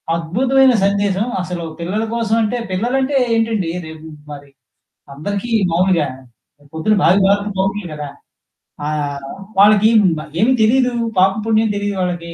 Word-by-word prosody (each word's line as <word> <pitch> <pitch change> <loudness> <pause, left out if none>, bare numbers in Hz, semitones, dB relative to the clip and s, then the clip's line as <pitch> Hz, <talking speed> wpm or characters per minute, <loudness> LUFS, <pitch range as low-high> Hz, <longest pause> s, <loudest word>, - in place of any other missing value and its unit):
అద్భుతమైన 255 +10 +2
సందేశం. 200 0 0 0.2
అసలు 175 -2 -5 0.2
పిల్లల 200 +6 -2
కోసం 225 -1 0
అంటే, 235 +3 -1
పిల్లలంటే 260 +8 -1 0.2
ఏంటండి, 225 -6 0 0.2
రేపు 160 0 -11 0.2
మరి 145 -1 -10 0.7
అందరికి 200 +9 -4 0.2
మామూలుగా 175 -3 +2 0.7
పొద్దున్న 160 +7 0
భావి 185 +4 +4
భారత 200 +1 +1
పౌరులు 195 0 -1
కదా! 150 -1 -6 0.8
ఆహ్, 145 -2 -3 0.3
వాళ్ళకి 210 +1 +6 0.5
ఏమి 255 +4 +4
తెలీదు. 250 +2 +2 0.3
పాప 190 +1 +5 0.2
పుణ్యం 220 0 +2
తెలీదు 205 0 -2
వాళ్ళకి. 175 -2 -4
200 Hz, 120 wpm, -17 LUFS, 170-225 Hz, 0.8 s, వాళ్ళకి